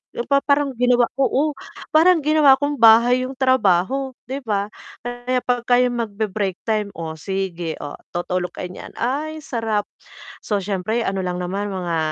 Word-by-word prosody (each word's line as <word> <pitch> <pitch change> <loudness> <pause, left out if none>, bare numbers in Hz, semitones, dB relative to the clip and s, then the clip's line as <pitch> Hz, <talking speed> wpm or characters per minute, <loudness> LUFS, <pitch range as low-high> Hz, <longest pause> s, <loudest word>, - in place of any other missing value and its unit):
Yung 235 - -3
pa 280 0 +4
parang 280 -1 +1
ginawa 245 0 +4
ko 275 - 0
oh, 300 +3 +1 0.4
parang 330 +1 +5
ginawa 300 -3 +6
kong 285 0 -2
bahay 235 +3 +6
yung 265 - -9
trabaho 260 0 +2 0.2
'di 270 +2 -5
ba? 205 -2 -1 0.4
Kaya 245 +1 -2
pagka 245 0 +2
yung 245 -1 +1
magbe-break 205 -3 -2
time, 215 -2 0
Oh, 160 -1 -5
sige, 180 -3 -3
oh, 145 - -6 0.2
tutulog 180 +1 -2
kayo 180 - -5
niyan. - - -10
"Ay, 295 +6 -2
sarap!" 225 -6 -1 0.6
So 210 - -1
siyempre 205 +4 -2
ano 195 0 -1
lang 180 0 -2
naman 195 +3 -3
mga 175 -3 -2
230 Hz, 165 wpm, -21 LUFS, 195-265 Hz, 0.6 s, ginawa